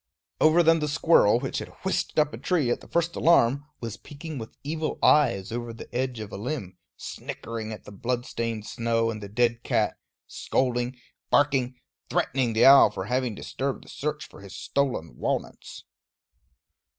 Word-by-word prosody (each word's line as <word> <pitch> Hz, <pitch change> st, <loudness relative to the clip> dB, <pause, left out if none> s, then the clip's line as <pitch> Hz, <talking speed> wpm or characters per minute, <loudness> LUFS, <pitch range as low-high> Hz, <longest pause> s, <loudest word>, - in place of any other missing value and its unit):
Over 160 Hz, +2 st, +5 dB
them 165 Hz, 0 st, +5 dB
the 150 Hz, -, -1 dB
squirrel, 150 Hz, -7 st, +4 dB
which 135 Hz, +1 st, -3 dB
had -, -, -6 dB, 0.2 s
whisked 190 Hz, -, -1 dB
up 150 Hz, 0 st, +3 dB
a -, -, -5 dB
tree 155 Hz, -10 st, +1 dB
at -, -, -1 dB
the -, -, -14 dB
first 170 Hz, 0 st, 0 dB
alarm, 140 Hz, -4 st, +4 dB, 0.2 s
was 115 Hz, -2 st, -5 dB
peeking 150 Hz, 0 st, -8 dB
with 110 Hz, -, -9 dB
evil 155 Hz, +2 st, -3 dB
eyes 110 Hz, -10 st, +4 dB
over 120 Hz, 0 st, -4 dB
the 115 Hz, -, -11 dB
edge 125 Hz, -1 st, -2 dB
of 105 Hz, -2 st, -7 dB
a -, -, -6 dB
limb, 105 Hz, -5 st, -4 dB, 0.2 s
snickering 115 Hz, -1 st, -6 dB
at 110 Hz, -, -8 dB
the -, -, -11 dB
blood 120 Hz, +4 st, -2 dB
stained 115 Hz, -2 st, -3 dB
snow 115 Hz, 0 st, 0 dB
and 110 Hz, -1 st, -7 dB
the 100 Hz, -, -7 dB
dead 115 Hz, +2 st, +1 dB
cat, -, -, 0 dB, 0.3 s
scolding, 125 Hz, 0 st, -1 dB, 0.3 s
barking, 135 Hz, -3 st, +2 dB, 0.3 s
threatening 125 Hz, -3 st, 0 dB
the 110 Hz, +2 st, +4 dB
owl 135 Hz, -4 st, +9 dB
for 95 Hz, -2 st, -5 dB
having 125 Hz, 0 st, -1 dB
disturbed 135 Hz, +5 st, -4 dB
the -, -, -16 dB
search 150 Hz, +1 st, -4 dB
for -, -, -15 dB
his 100 Hz, 0 st, -10 dB
stolen 95 Hz, -, -2 dB
walnuts. -, -, -4 dB
125 Hz, 175 wpm, -26 LUFS, 115-145 Hz, 0.3 s, owl